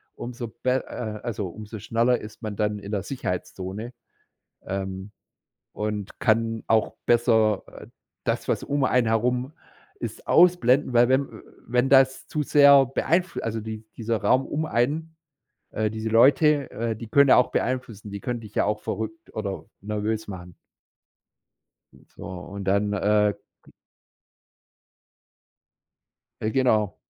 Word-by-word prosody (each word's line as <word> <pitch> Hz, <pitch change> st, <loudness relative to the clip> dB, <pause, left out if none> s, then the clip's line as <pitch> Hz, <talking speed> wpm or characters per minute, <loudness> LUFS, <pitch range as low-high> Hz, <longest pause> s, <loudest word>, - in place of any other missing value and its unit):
umso 120 Hz, 0 st, -6 dB, 0.2 s
be 130 Hz, 0 st, +1 dB
äh, 110 Hz, -3 st, -5 dB
also 105 Hz, -5 st, -3 dB
umso 110 Hz, +4 st, -9 dB
schneller 115 Hz, +3 st, +1 dB
ist 105 Hz, +2 st, -11 dB
man 110 Hz, -3 st, -5 dB
dann 105 Hz, 0 st, 0 dB
in 100 Hz, 0 st, -9 dB
der 100 Hz, -3 st, -1 dB
Sicherheitszone, 100 Hz, -1 st, -5 dB, 0.7 s
ähm, 95 Hz, +1 st, -5 dB, 0.6 s
und 105 Hz, -2 st, -4 dB
kann 115 Hz, 0 st, +1 dB
auch 110 Hz, 0 st, +2 dB
besser, 110 Hz, -4 st, +3 dB
äh, -, -, -12 dB, 0.4 s
das, -, -, -1 dB
was -, -, 0 dB
um 145 Hz, -1 st, -1 dB
einen 125 Hz, -2 st, +2 dB
herum 125 Hz, +4 st, 0 dB, 0.5 s
ist -, -, -7 dB
ausblenden, 150 Hz, -7 st, +4 dB
weil 120 Hz, +1 st, +5 dB
wenn 130 Hz, +1 st, +4 dB
äh, -, -, -12 dB, 0.3 s
wenn 125 Hz, +2 st, +1 dB
das 135 Hz, -1 st, +4 dB
zu 150 Hz, -, -2 dB
sehr 140 Hz, -1 st, +7 dB
beeinfl 170 Hz, +7 st, 0 dB
also 115 Hz, 0 st, -3 dB
die 110 Hz, 0 st, -7 dB
dieser 115 Hz, 0 st, -1 dB
Raum 130 Hz, +1 st, +3 dB
um 155 Hz, +2 st, -2 dB
einen 155 Hz, +6 st, -1 dB, 0.6 s
äh, 110 Hz, 0 st, -1 dB
diese 110 Hz, +1 st, -4 dB
Leute, 140 Hz, +5 st, +4 dB
äh, 115 Hz, 0 st, -3 dB
die 115 Hz, +1 st, -9 dB
können 140 Hz, +5 st, +5 dB
ja -, -, +8 dB
auch 125 Hz, -, +3 dB
beeinflussen, 115 Hz, -5 st, -3 dB
die 100 Hz, 0 st, -6 dB
können 120 Hz, +2 st, -3 dB
dich 110 Hz, -3 st, -12 dB
ja -, -, +2 dB
auch 105 Hz, +1 st, -1 dB
verrückt 160 Hz, +13 st, -6 dB
oder 100 Hz, -3 st, -4 dB, 0.2 s
nervös 105 Hz, +1 st, -2 dB
machen. 90 Hz, -3 st, -8 dB, 1.4 s
Und -, -, -22 dB
so, -, -, -12 dB
und 95 Hz, +2 st, -7 dB
dann, 100 Hz, +2 st, +1 dB
äh, 105 Hz, +1 st, +2 dB, 0.3 s
ge -, -, -20 dB, 2.7 s
Äh, 110 Hz, -, -1 dB
genau. 110 Hz, -5 st, +2 dB
115 Hz, 145 wpm, -25 LUFS, 105-130 Hz, 2.7 s, ja